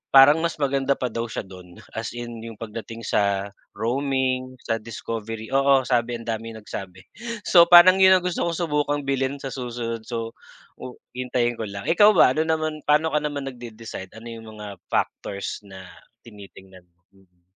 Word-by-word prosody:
parang 140 Hz, +4 st, +8 dB
mas 170 Hz, +1 st, -1 dB
maganda 140 Hz, -1 st, +1 dB
pa 125 Hz, -2 st, -3 dB
daw 115 Hz, +1 st, -3 dB
siya 110 Hz, -, -5 dB
dun, 90 Hz, -2 st, -13 dB, 0.2 s
as 115 Hz, +1 st, -5 dB
in 120 Hz, -1 st, -6 dB
yung 115 Hz, 0 st, -8 dB
pagdating 115 Hz, +1 st, -8 dB
sa 100 Hz, -1 st, 0 dB, 0.2 s
roaming, 130 Hz, +2 st, -1 dB
sa 115 Hz, 0 st, -1 dB
discovery, 115 Hz, +1 st, -6 dB
oo, 135 Hz, 0 st, +4 dB
sabi 120 Hz, -1 st, 0 dB
ang 115 Hz, -, -7 dB
daming 115 Hz, 0 st, -4 dB
nagsabi. 95 Hz, -3 st, -8 dB, 0.4 s
So 170 Hz, -2 st, +6 dB
parang 180 Hz, +2 st, +8 dB
yun 190 Hz, 0 st, +8 dB
ang 180 Hz, -, -4 dB
gusto 180 Hz, -1 st, -1 dB
kong 170 Hz, -, -2 dB
subukang 150 Hz, -3 st, 0 dB
bilhin 135 Hz, 0 st, 0 dB
sa 135 Hz, -, -4 dB
susunod 120 Hz, -3 st, -5 dB
so 115 Hz, -1 st, -4 dB, 0.5 s
oh 125 Hz, -, -8 dB, 0.2 s
hintayin 125 Hz, -2 st, -1 dB
ko 110 Hz, -, -3 dB
lang. 100 Hz, 0 st, -7 dB
Ikaw 205 Hz, +6 st, +6 dB
ba 130 Hz, -, +6 dB
ano 155 Hz, -, +2 dB
naman 155 Hz, -1 st, -1 dB
paano 150 Hz, +2 st, +3 dB
ka 150 Hz, -, +2 dB
naman 145 Hz, -2 st, -4 dB
nag-de-decide, 115 Hz, -6 st, -8 dB
ano 115 Hz, +1 st, -10 dB
yung 115 Hz, -1 st, -10 dB
mga 105 Hz, -1 st, -8 dB
factors 100 Hz, 0 st, -2 dB
na 95 Hz, -1 st, -10 dB, 0.4 s
tinitingnan, 95 Hz, -3 st, -14 dB, 0.3 s
mm? 90 Hz, -2 st, -27 dB
120 Hz, 170 wpm, -24 LUFS, 110-140 Hz, 0.5 s, parang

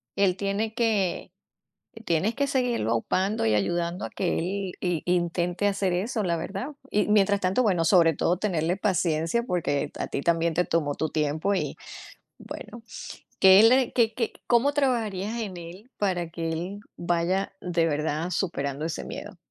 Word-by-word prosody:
Él 190 Hz, -2 st, +3 dB
tiene 205 Hz, +3 st, -1 dB
que 215 Hz, -6 st, 0 dB, 0.7 s
tienes 170 Hz, +7 st, +1 dB
que 280 Hz, 0 st, 0 dB
seguirlo 245 Hz, -, 0 dB
upando 185 Hz, -, 0 dB
y 110 Hz, -1 st, +3 dB
ayudando 170 Hz, -, -1 dB
a -, -, -6 dB
que 180 Hz, -, -1 dB
él 190 Hz, +2 st, -2 dB
i 175 Hz, -4 st, 0 dB
intente 175 Hz, +2 st, 0 dB
hacer 195 Hz, -2 st, 0 dB
eso, 210 Hz, +4 st, -1 dB
la 170 Hz, -2 st, 0 dB
verdad, 195 Hz, -, -4 dB, 0.2 s
y 210 Hz, -, +2 dB
mientras 200 Hz, -1 st, +4 dB
tanto 185 Hz, +6 st, +2 dB
bueno, 180 Hz, -6 st, +2 dB
sobre 165 Hz, -2 st, +5 dB
todo 175 Hz, +1 st, +1 dB
tenerle 180 Hz, -3 st, 0 dB
paciencia, 175 Hz, +1 st, +1 dB
porque 155 Hz, -, -1 dB
a -, -, -2 dB
ti 140 Hz, -, -3 dB
también 165 Hz, 0 st, +1 dB
te 180 Hz, +2 st, +1 dB
tomó 150 Hz, -4 st, 0 dB
tu 160 Hz, -, -2 dB
tiempo 155 Hz, +6 st, 0 dB
y, -, -, -2 dB, 0.6 s
bueno, 235 Hz, -1 st, -9 dB, 0.6 s
que 190 Hz, +2 st, +8 dB
le 250 Hz, +2 st, +5 dB
que 230 Hz, -3 st, +3 dB
que 230 Hz, -1 st, -1 dB, 0.2 s
¿cómo 245 Hz, +4 st, +4 dB
trabajarías 230 Hz, -6 st, 0 dB
en 195 Hz, -5 st, -5 dB
él 180 Hz, +8 st, -11 dB
para 180 Hz, -4 st, -1 dB
que 165 Hz, -1 st, -4 dB
él 180 Hz, +5 st, -4 dB, 0.2 s
vaya 175 Hz, +3 st, 0 dB
de 170 Hz, -2 st, +1 dB
verdad 155 Hz, +2 st, -1 dB
superando 145 Hz, -6 st, -2 dB
ese 165 Hz, -, -4 dB
miedo? 205 Hz, -3 st, -8 dB
185 Hz, 165 wpm, -26 LUFS, 165-210 Hz, 0.7 s, que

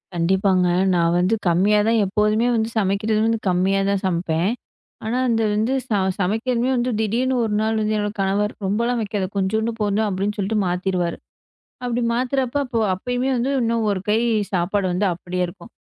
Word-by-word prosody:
கண்டிப்பாங்க. 185 Hz, +1 st, +2 dB, 0.3 s
நான் 170 Hz, 0 st, +2 dB
வந்து 185 Hz, +5 st, +2 dB
கம்மியா 195 Hz, +5 st, +3 dB
தான். 230 Hz, -1 st, +3 dB
எப்போதுமே 210 Hz, +4 st, +1 dB
வந்து 220 Hz, 0 st, 0 dB
சமைக்கிறது 210 Hz, +2 st, 0 dB
வந்து 225 Hz, 0 st, +1 dB
கம்மியா 185 Hz, +2 st, +2 dB
தான் 200 Hz, -1 st, 0 dB
சமைப்பேன். 170 Hz, +1 st, 0 dB, 0.5 s
ஆனா, 230 Hz, +3 st, -1 dB
அந்த 225 Hz, -1 st, +1 dB
வந்து 220 Hz, +5 st, 0 dB
ச -, -, -41 dB, 0.3 s
சமைக்கிறதுமே 235 Hz, +6 st, 0 dB
வந்து 245 Hz, 0 st, 0 dB
திடீர்னு 240 Hz, +5 st, 0 dB
ஒரு 210 Hz, -, -2 dB
நாள் 220 Hz, 0 st, 0 dB, 0.2 s
என்னோட 205 Hz, -1 st, -1 dB
கணவர் 200 Hz, +2 st, 0 dB
ரொம்ப 205 Hz, +3 st, 0 dB
எல்லாம் 245 Hz, 0 st, 0 dB
வெக்காத. 205 Hz, -2 st, -2 dB
கொஞ்சோன்டு 220 Hz, +4 st, 0 dB
போதும் 210 Hz, +1 st, +1 dB
அப்பிடின்னு 200 Hz, +2 st, -2 dB
சொல்லிட்டு 205 Hz, +2 st, 0 dB
மாத்திருவாரு. 180 Hz, -1 st, -1 dB, 0.7 s
அப்பிடி 245 Hz, 0 st, -1 dB
மாத்துறப்ப 255 Hz, +2 st, 0 dB, 0.4 s
அப்பயுமே 245 Hz, +7 st, -2 dB
வந்து 245 Hz, +3 st, 0 dB
இன்னும் 230 Hz, -1 st, 0 dB
ஒரு 195 Hz, -, -1 dB
கை 215 Hz, +2 st, +3 dB, 0.3 s
சாப்பாடு 190 Hz, +2 st, 0 dB
வந்து 195 Hz, +3 st, +1 dB
அப்பிடியே 180 Hz, +1 st, -3 dB
இருக்கும். 200 Hz, +5 st, -12 dB
210 Hz, 160 wpm, -21 LUFS, 190-225 Hz, 0.7 s, கம்மியா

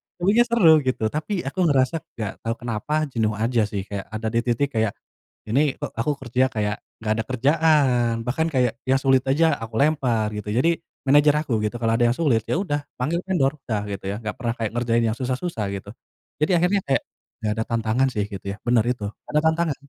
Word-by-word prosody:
Iya, -, -, -26 dB
tapinya 215 Hz, +6 st, +5 dB
seru 230 Hz, -9 st, +5 dB, 0.2 s
gitu. 125 Hz, -3 st, 0 dB
Tapi 155 Hz, +7 st, -3 dB
aku 140 Hz, +8 st, -5 dB
ngerasa 135 Hz, +1 st, +2 dB, 0.2 s
gak 110 Hz, -3 st, -4 dB
tahu 115 Hz, +1 st, 0 dB
kenapa 115 Hz, +5 st, -3 dB, 0.2 s
jenuh 110 Hz, -3 st, 0 dB
aja 115 Hz, +1 st, +1 dB
sih, 100 Hz, -2 st, -2 dB
kayak 100 Hz, -1 st, -4 dB
ada 110 Hz, 0 st, -3 dB
di 115 Hz, -, +3 dB
titik 125 Hz, +4 st, +1 dB
kayak 110 Hz, -2 st, +1 dB, 0.6 s
ini 135 Hz, +6 st, +3 dB, 0.2 s
kok -, -, -4 dB
aku 150 Hz, +6 st, +1 dB
kerja 125 Hz, +1 st, +1 dB
kayak 105 Hz, -1 st, -1 dB, 0.3 s
gak 110 Hz, 0 st, +1 dB
ada -, -, 0 dB
kerjaan, 130 Hz, -3 st, +3 dB
bahkan 160 Hz, +6 st, 0 dB
kayak 125 Hz, -3 st, +1 dB
yang 135 Hz, -, +5 dB
sulit 135 Hz, -1 st, +4 dB
aja 155 Hz, +1 st, +3 dB
aku 110 Hz, 0 st, -7 dB
lempar 125 Hz, -8 st, +2 dB
gitu. 105 Hz, -, -6 dB
Jadi 165 Hz, +7 st, +3 dB, 0.3 s
manajer 145 Hz, +1 st, +6 dB
aku 140 Hz, -6 st, -3 dB
gitu 105 Hz, -, -3 dB
kalau 115 Hz, 0 st, +2 dB
ada 120 Hz, -, +4 dB
yang 120 Hz, -, +1 dB
sulit, 135 Hz, -9 st, +2 dB
ya -, -, +1 dB
udah 145 Hz, -7 st, -1 dB, 0.2 s
panggil 160 Hz, +7 st, 0 dB
vendor, 155 Hz, -6 st, +2 dB
udah 110 Hz, -3 st, -2 dB
gitu 95 Hz, -1 st, -6 dB
ya 105 Hz, -, -4 dB
gak 110 Hz, -, -3 dB
pernah 115 Hz, -2 st, -1 dB
kayak 110 Hz, -2 st, -2 dB
ngerjain 115 Hz, -1 st, +1 dB
yang -, -, -10 dB
susah-susah 130 Hz, -, -2 dB
gitu. 100 Hz, +1 st, -8 dB, 0.5 s
Jadi 155 Hz, -, +2 dB
akhirnya 185 Hz, +3 st, +2 dB
kayak 135 Hz, -, +2 dB, 0.4 s
gak 105 Hz, -, +1 dB
ada -, -, +1 dB
tantangan 115 Hz, +3 st, +1 dB
sih 105 Hz, -2 st, 0 dB
gitu 100 Hz, 0 st, -7 dB
ya, 100 Hz, -, -7 dB
bener 120 Hz, -2 st, +3 dB
itu, 110 Hz, -5 st, -4 dB
ga -, -, -26 dB
ada 150 Hz, -, +5 dB
tantangan 160 Hz, -3 st, 0 dB
125 Hz, 210 wpm, -23 LUFS, 110-150 Hz, 0.6 s, manajer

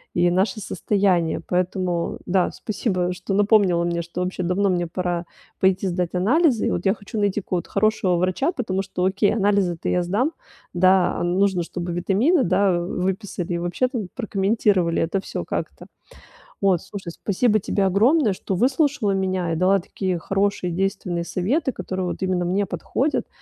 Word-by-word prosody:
и 175 Hz, 0 st, +3 dB
наше 190 Hz, +4 st, +1 dB
состояние. 190 Hz, -4 st, +1 dB
Поэтому 180 Hz, -1 st, -1 dB
да, 185 Hz, 0 st, +1 dB
спасибо, 185 Hz, -4 st, -2 dB
что 180 Hz, +2 st, -5 dB
напомнила 200 Hz, -4 st, +3 dB
мне, 170 Hz, 0 st, -1 dB
что 170 Hz, +1 st, -5 dB
вообще 185 Hz, 0 st, -2 dB
давно 185 Hz, +3 st, +1 dB
мне 175 Hz, -2 st, 0 dB
пора 175 Hz, 0 st, -2 dB, 0.3 s
пойти 190 Hz, 0 st, +2 dB
сдать 180 Hz, -1 st, -2 dB
анализы. 250 Hz, -, +3 dB
И -, -, 0 dB
вот 175 Hz, -, -2 dB
я 195 Hz, -, +4 dB
хочу 205 Hz, +1 st, -6 dB
найти 205 Hz, 0 st, +1 dB
какого-то 180 Hz, -2 st, -3 dB
хорошего 200 Hz, -3 st, +2 dB
врача, 185 Hz, -, +1 dB
потому 195 Hz, -, -2 dB
что 185 Hz, -2 st, -2 dB
окей, 195 Hz, +2 st, +2 dB
анализы-то 200 Hz, -5 st, +1 dB
я 180 Hz, -, +2 dB
сдам, 210 Hz, -, 0 dB, 0.4 s
да, 185 Hz, 0 st, +4 dB
а -, -, -1 dB
нужно, 185 Hz, +1 st, +1 dB
чтобы 175 Hz, +1 st, -5 dB
витамины, 215 Hz, -, +2 dB
да, 185 Hz, 0 st, +2 dB
выписали 185 Hz, 0 st, -3 dB
и -, -, 0 dB
вообще, 175 Hz, +9 st, 0 dB
там, 230 Hz, -6 st, -4 dB
прокомментировали 200 Hz, -5 st, +1 dB
это 170 Hz, +4 st, 0 dB
всё -, -, -5 dB
как-то. -, -, -5 dB, 0.8 s
Вот. 190 Hz, -4 st, +3 dB
Слушай, 190 Hz, -4 st, -7 dB
спасибо 215 Hz, +4 st, +1 dB
тебе 195 Hz, +1 st, 0 dB
огромное, 220 Hz, -, +3 dB
что 190 Hz, +1 st, -4 dB
выслушала 260 Hz, -, +1 dB
меня 185 Hz, -3 st, -1 dB
и -, -, -1 dB
дала 185 Hz, +4 st, +3 dB
такие 185 Hz, 0 st, -3 dB
хорошие, 195 Hz, +1 st, -1 dB
действенные 185 Hz, -1 st, -2 dB
советы, 240 Hz, -, 0 dB
которые 185 Hz, -1 st, -4 dB
вот 180 Hz, -, -5 dB
именно 185 Hz, -1 st, 0 dB
мне 195 Hz, +3 st, 0 dB
подходят. 280 Hz, -, -1 dB
190 Hz, 165 wpm, -22 LUFS, 180-205 Hz, 0.8 s, я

